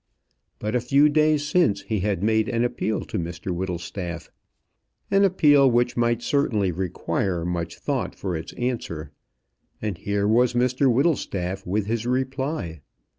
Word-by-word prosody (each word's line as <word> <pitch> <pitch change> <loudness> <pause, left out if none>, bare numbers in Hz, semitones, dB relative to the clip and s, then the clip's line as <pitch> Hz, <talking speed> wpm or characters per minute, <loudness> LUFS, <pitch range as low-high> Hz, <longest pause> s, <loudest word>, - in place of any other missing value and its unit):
But 105 +1 -3
a 125 - +2
few 140 +5 +4
days 155 0 +3
since 150 - +2
he 110 -2 -2
had 100 -1 -1
made 110 0 +2
an 115 0 +1
appeal 110 -3 -1
to - - -4
Mr 85 +2 -4
Whittlestaff 90 -1 -5 0.8
an 195 0 +4
appeal 145 -8 +5
which 120 0 +2 0.3
certainly 115 - +1
might 85 - -9
require 90 -1 -1
much 85 -1 -3
thought - - -2
for 95 -3 -3
its 80 0 -6
answer 85 - -3 0.7
and 105 -5 -4
here 100 0 0
was 120 +3 +3
Mr 125 +2 +3
Whittlestaff 95 - 0
with 100 +2 0
his 115 +2 -2
reply. 130 - -2
110 Hz, 145 wpm, -24 LUFS, 90-130 Hz, 0.8 s, appeal